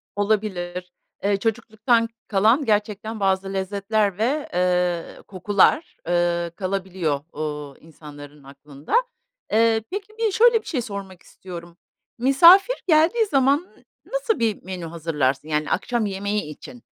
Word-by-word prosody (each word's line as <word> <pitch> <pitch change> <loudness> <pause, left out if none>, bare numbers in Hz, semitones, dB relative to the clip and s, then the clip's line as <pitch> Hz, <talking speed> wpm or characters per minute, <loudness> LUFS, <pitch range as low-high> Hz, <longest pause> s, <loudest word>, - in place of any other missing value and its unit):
Olabilir. 190 -4 -2 0.3
Eee, 200 0 +2
çocukluktan 230 +1 0 0.2
kalan 220 +8 +3
gerçekten 215 0 -1
bazı 195 0 0
lezzetler 200 +1 -1
ve, 275 +7 -1
eee, 180 -1 0
kokular, 205 - +1
ııı, 175 -1 +1
kalabiliyor, 185 -6 -2 0.2
ııı, 150 -2 -5
insanların 145 -2 -13
aklında. 140 +1 -11 0.6
Eee, 225 0 +3
peki, 400 +2 -6
bi 445 -3 +1
şöyle 460 +2 +4
bir - - -19
şey 260 -7 -1
sormak 200 -4 -8
istiyorum: 170 -2 -11 0.4
Misafir 340 - +6
geldiği 330 +8 +4
zaman 275 -5 +3 0.5
n - - -21
nasıl - - 0
bir 225 -3 -1
menü 180 -2 -6
hazırlarsın? 155 -4 -2
Yani 150 -1 -1
akşam 240 -3 0
yemeği 200 +1 -2
için 155 - -11
200 Hz, 125 wpm, -23 LUFS, 175-235 Hz, 0.6 s, Misafir